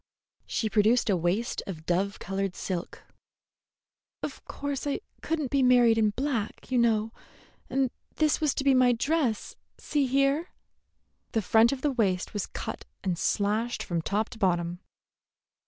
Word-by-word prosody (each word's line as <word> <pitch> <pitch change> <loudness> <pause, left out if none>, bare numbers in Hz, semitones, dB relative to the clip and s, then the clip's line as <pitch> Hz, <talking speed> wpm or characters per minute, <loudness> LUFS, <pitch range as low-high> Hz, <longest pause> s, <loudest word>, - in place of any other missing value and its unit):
She 220 - -1
produced 215 +2 +3
a - - +3
waist 180 +7 0
of 160 -5 -7
dove 195 +3 0
colored 195 0 -3
silk. 180 -2 -5 1.2
"Of - - -5
course 285 0 -4
I 285 - -1 0.2
could 325 0 -1
n't 275 -5 -3
be 275 - +3
married 245 -3 +5
in 215 -1 +4
black, 245 0 -3
you 250 - +3
know, 225 -2 +2 0.6
and 265 -1 +1 0.2
this 310 -1 +2
was 300 -3 +2
to - - -1
be 275 -1 +5
my 255 -1 +5
dress. 255 -2 0 0.2
See 285 -3 0
here." 275 +6 +2 0.8
The 225 - +1
front 225 +4 +5
of 275 -2 -3
the 295 - +1
waist 195 -8 0
was 205 - -2
cut - - -6 0.2
and 185 -2 0
slashed 210 +6 0
from 170 -2 -2
top 210 +6 -1
to 225 - -11
bottom. 175 -3 +1
225 Hz, 155 wpm, -28 LUFS, 195-270 Hz, 1.2 s, married